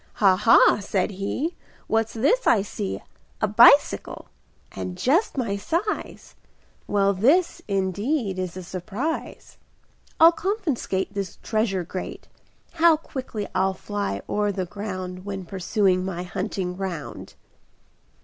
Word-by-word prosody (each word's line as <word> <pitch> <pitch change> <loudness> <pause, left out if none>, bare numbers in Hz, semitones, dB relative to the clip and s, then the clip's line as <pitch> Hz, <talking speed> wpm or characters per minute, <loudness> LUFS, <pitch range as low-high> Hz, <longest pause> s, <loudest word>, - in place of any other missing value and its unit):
"Ha! 195 -3 +4
Ha!" 210 +2 +5
said 200 -1 -1
he, 205 - -3 0.3
"What's 225 0 0
this 355 - +2
I 210 -4 +4
see, 200 -1 -5 0.4
A 215 - +1
bicycle! 235 +7 +5 0.4
and 180 -1 -6
just 290 - +1
my 220 -6 -1
size! 340 - -3 0.5
Well, 200 -1 +2
this, 285 - +2
indeed, 200 - -1
is 185 -1 -4
a 185 - -6
surprise! 210 - -5 0.6
I'll 330 +1 +9
confiscate 320 - -2
This 195 -3 -4
treasure 215 -4 0
great; 185 +2 -7 0.4
How 335 -2 +5
quickly 255 -8 -6
I'll 190 +1 +1
fly 205 - -4
o'er 205 0 0
the 190 -2 -3
ground 185 -1 -6
When 195 -1 -5
I - - -14
pursue 190 +1 +1
my 185 -1 -4
hunting 180 0 -4
round!" 185 -5 -6
200 Hz, 125 wpm, -24 LUFS, 185-245 Hz, 0.6 s, I'll